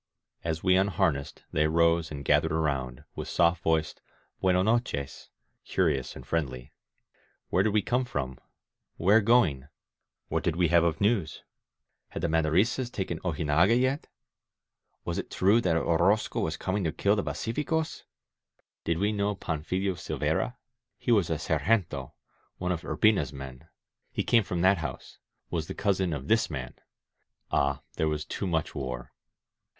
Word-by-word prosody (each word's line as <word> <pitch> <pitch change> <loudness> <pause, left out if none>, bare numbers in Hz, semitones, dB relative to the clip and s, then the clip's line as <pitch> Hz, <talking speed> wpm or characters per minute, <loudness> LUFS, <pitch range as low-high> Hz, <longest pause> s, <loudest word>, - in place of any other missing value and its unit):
As 80 -1 -2
we 90 -1 +4
unharnessed 85 -7 0
they 75 - +2
rose 85 0 +3
and 70 -2 -7
gathered 75 +3 +3
around, 70 -6 -1
with - - -5
soft 85 0 +2
voiced 80 -1 0 0.4
Btieno 90 0 +3
nochesy* 110 - -1 0.3
curious 75 -8 0
and - - -10
friendly. 65 -7 -3 0.8
Where 95 - +3
did 110 - +2
we 105 -1 +2
come 125 +1 +1
from? 65 - -4 0.6
Where 100 +6 +5
going? 100 - +3 0.6
What - - -1
did 85 - 0
we 85 -2 +2
have 85 0 +5
of 85 -1 0
news? 100 -7 +1 0.6
Had - - -7
the 85 - +1
Maderistas 85 +11 +2
taken 90 -4 -3
Ojinaga 85 +6 +2
yet? 130 +3 0 1.0
Was - - -2
it - - -5
true 100 +5 +3
that 85 -5 +2
Orozco 85 +6 +2
was 80 0 -1
coming 95 +1 -1
to 80 - +1
kill 100 +5 +2
the 100 - 0
pacificosf 150 +7 -2 0.8
Did 85 -1 0
we 100 +4 +1
know 100 -1 0
Panfilo 90 +4 -2
Silveyra? 85 - -1 0.4
He - - -1
was 100 -7 +3
a 80 - +1
sergentOy 80 +6 0 0.5
one 90 0 -2
of 85 -2 -2
Urbina's 95 - +2
men. 70 +1 -9 0.4
He - - -1
came 115 - +4
from 90 -3 -3
that 95 0 +4
house, 80 - -7 0.3
was 80 -2 -2
the - - -6
cousin 95 -3 +1
of 70 -2 -4
this 115 0 +3
man. 65 -5 -5 0.8
Ah, 70 -1 +1
there 80 - +1
was 75 -1 -2
too 100 - -4
much 80 -3 -1
war 65 -3 -5
85 Hz, 155 wpm, -28 LUFS, 75-100 Hz, 1.0 s, Where